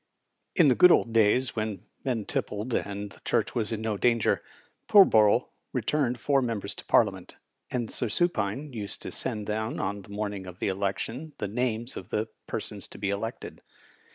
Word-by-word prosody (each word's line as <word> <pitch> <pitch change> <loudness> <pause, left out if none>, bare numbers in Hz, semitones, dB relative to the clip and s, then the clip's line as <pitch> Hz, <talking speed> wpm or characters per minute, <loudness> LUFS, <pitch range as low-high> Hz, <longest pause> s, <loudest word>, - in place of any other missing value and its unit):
In 165 - +6
the 130 - +6
good 180 +7 +7
old 115 - +3
days, 115 +2 +3
when 110 -2 -3 0.2
men 120 -6 -1
tippled 105 +4 -3
more - - +2
and 100 0 -6
the - - -15
Church - - 0
was 110 -2 -1
in 110 -1 -2
no 110 -2 -1
danger, 115 0 +2 0.5
Pullborough 110 - +6 0.2
returned 130 -5 0
four 140 -1 +2
members 115 -5 -3
to - - -9
Parliament; - - +2 0.3
and 120 -3 -2
Sir 120 - -1
Supine 135 - 0
used 105 -3 -6
to - - -5
send 105 -1 -2
down 110 +2 -2
on 100 0 -2
the 95 - -16
morning 100 -2 -4
of 90 -1 -9
the 100 - -1
election 100 - -3
the 105 - -2
names 120 +2 -1
of 95 - -8
the 110 +1 -1 0.2
persons - - -5
to - - -12
be 100 -1 -1
elected. 115 +4 -5
110 Hz, 180 wpm, -28 LUFS, 100-125 Hz, 0.5 s, good